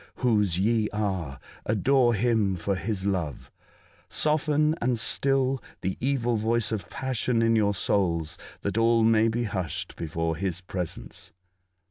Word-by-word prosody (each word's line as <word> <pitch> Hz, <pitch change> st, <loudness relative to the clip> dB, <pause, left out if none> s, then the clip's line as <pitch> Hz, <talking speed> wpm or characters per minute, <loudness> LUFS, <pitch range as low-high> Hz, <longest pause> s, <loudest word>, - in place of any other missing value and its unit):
Whose 105 Hz, -8 st, +2 dB
ye 110 Hz, +1 st, +2 dB
are! 95 Hz, -11 st, -3 dB, 0.2 s
Adore 120 Hz, +3 st, +3 dB
Him 110 Hz, -3 st, +1 dB
for 90 Hz, +3 st, -2 dB
His 95 Hz, +1 st, -3 dB
love! 90 Hz, -7 st, -2 dB, 0.6 s
Soften 150 Hz, 0 st, +1 dB
and 120 Hz, 0 st, +1 dB
still 135 Hz, +3 st, +2 dB, 0.2 s
the 95 Hz, 0 st, -2 dB
evil 120 Hz, -3 st, 0 dB
voice 115 Hz, +1 st, 0 dB
of 110 Hz, -3 st, -4 dB
passion 125 Hz, -2 st, -1 dB
in 115 Hz, 0 st, +3 dB
your 105 Hz, -2 st, +2 dB
souls, 85 Hz, -5 st, 0 dB, 0.3 s
that 100 Hz, +2 st, -1 dB
all 115 Hz, 0 st, +4 dB
may 110 Hz, 0 st, +4 dB
be 115 Hz, +2 st, 0 dB
hushed 90 Hz, -5 st, -4 dB
before 80 Hz, 0 st, -2 dB
His 90 Hz, -1 st, -2 dB
presence 90 Hz, -2 st, -6 dB
110 Hz, 135 wpm, -26 LUFS, 95-120 Hz, 0.6 s, all